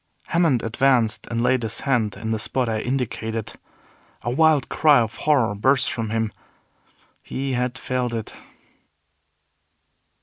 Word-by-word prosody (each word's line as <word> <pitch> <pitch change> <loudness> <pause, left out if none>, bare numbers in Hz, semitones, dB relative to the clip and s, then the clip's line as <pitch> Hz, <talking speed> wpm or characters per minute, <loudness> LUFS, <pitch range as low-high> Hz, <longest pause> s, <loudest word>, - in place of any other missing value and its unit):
Hammond 165 -8 +2
advanced 120 -1 +1
and 115 0 -1
laid 130 0 +2
his 110 -1 -4
hand 115 -7 0
in 110 - -4
the 110 - -1
spot 125 +3 -1
I 110 -1 -1
indicated. 115 -3 -3 0.7
A 120 - -1
wild 155 0 +3
cry 150 -3 +4
of 115 -1 -1
horror 135 -9 +2
burst 130 +6 +2
from 110 0 -3
him. 110 -1 -1 0.9
He 135 0 -4
had 125 0 -1
felt 125 0 -2
it! 110 -2 -5
120 Hz, 135 wpm, -23 LUFS, 110-135 Hz, 0.9 s, cry